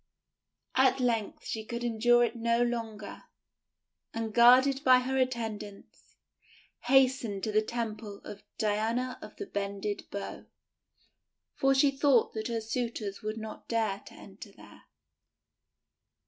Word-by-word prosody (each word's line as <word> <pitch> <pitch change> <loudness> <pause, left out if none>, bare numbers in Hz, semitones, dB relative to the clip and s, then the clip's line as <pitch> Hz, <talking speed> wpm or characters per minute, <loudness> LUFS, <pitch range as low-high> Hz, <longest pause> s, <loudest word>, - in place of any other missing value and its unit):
At 260 0 +3
length 230 -4 -1
she 220 - -4
could 235 +2 -5
endure 240 +1 +3
it 235 0 -1
no 235 +1 +1
longer, 225 -3 -5 0.9
and, 225 -1 -3
guarded 255 +4 +6
by 255 -2 +7
her 260 +1 -2
attendants, 225 -6 -4 0.7
hastened 255 -6 +3
to 215 - -1
the 215 +1 +3
temple 220 -2 -5
of 205 - -9 0.2
Diana 225 +4 -1
of - - -10
the 405 - -6
Bended 200 - -4
Bow, 200 - -6 1.1
for 270 0 +2
she 275 +1 +4
thought 270 -4 +3
that 220 0 -3
her 230 -1 -2
suitors 225 -3 -4
would 215 +1 -4
not 220 0 -8
dare 220 -4 0
to - - -13
enter - - -12
there. - - -17
230 Hz, 130 wpm, -30 LUFS, 215-250 Hz, 1.1 s, by